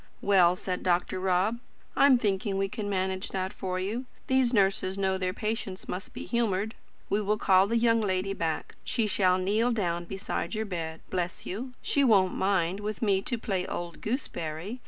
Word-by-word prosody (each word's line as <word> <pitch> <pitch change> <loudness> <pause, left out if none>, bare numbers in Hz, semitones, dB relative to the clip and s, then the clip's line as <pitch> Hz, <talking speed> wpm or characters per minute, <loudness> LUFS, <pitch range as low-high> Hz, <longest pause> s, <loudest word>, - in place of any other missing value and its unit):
"Well," 180 -3 +5
said 185 0 -3
Dr. 180 0 +1
Rob, 190 +5 +1 0.4
"I'm 275 -2 +6
thinking 200 -3 0
we 195 0 +1
can 205 0 -4
manage 190 -1 -1
that 190 0 -3
for 185 -1 -3
you. 215 +7 -3 0.2
These 260 -2 +3
nurses 195 -3 +2
know 190 -1 +1
their 185 -1 0
patients 210 -2 -4
must 185 +1 -5
be 255 - -7
humoured. 220 -3 0 0.3
We 205 - +1
will 210 +1 +1
call 190 -1 +4
the 230 +2 +1
young 230 -1 +3
lady 195 -1 0
back, 165 -4 -2
and - - -36
she 230 - 0
shall 185 -3 +3
kneel 210 +6 +1
down 175 -6 -1
beside 195 +4 -3
your 220 +1 -1
bed 165 -5 -5
Bless 180 -1 -2
you! 250 +7 -5
She 285 - +2
won't 200 -7 +4
mind, 190 -1 +1
with 210 +1 -4
me 195 -3 +3
to 240 +4 -2
play 190 -4 -2
old 175 -1 -5
Gooseberry! 200 - -3
195 Hz, 185 wpm, -28 LUFS, 185-220 Hz, 0.4 s, I'm